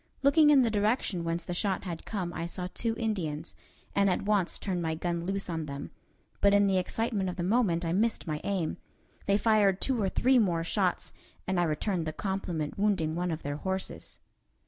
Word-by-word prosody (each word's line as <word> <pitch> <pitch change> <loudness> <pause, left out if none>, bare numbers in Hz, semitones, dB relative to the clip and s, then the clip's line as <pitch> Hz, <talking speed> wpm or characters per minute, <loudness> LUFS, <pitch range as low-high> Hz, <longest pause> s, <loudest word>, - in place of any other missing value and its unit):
Looking 295 +2 +6
in 280 -3 +6
the 230 - +1
direction 210 -3 0
whence 165 0 -2
the 175 - -4
shot 190 +1 -1
had 170 -4 -6
come 180 -5 -3
I 170 - -3
saw 180 +1 -5
two 230 -1 +1
Indians, 170 -9 -3 0.4
and 200 0 +3
at 185 - 0
once 205 -3 +1
turned 185 -3 -2
my 160 -1 -1
gun 170 +1 -2
loose 195 +1 -2
on 160 -3 -3
them, 140 0 -6 0.5
but 200 0 +5
in 205 0 +5
the 190 -1 +3
excitement 200 +1 -1
of 180 - -5
the 175 - -3
moment 185 -4 +2
I 165 - 0
missed 220 +4 +1
my 155 -3 -3
aim. 190 -5 -1 0.5
They 200 0 +4
fired 210 -3 +3
two 255 -4 +1
or 195 - +1
three 255 +6 +3
more 175 -6 +1
shots, 185 +1 0 0.3
and 185 -1 0
I 175 - +3
returned 165 +2 -1
the 155 - -3
compliment, 180 -5 -3
wounding 190 -7 +1
one 180 +1 -1
of 160 -1 -4
their 145 0 -3
horses. 190 +3 -4
190 Hz, 205 wpm, -29 LUFS, 170-210 Hz, 0.5 s, Looking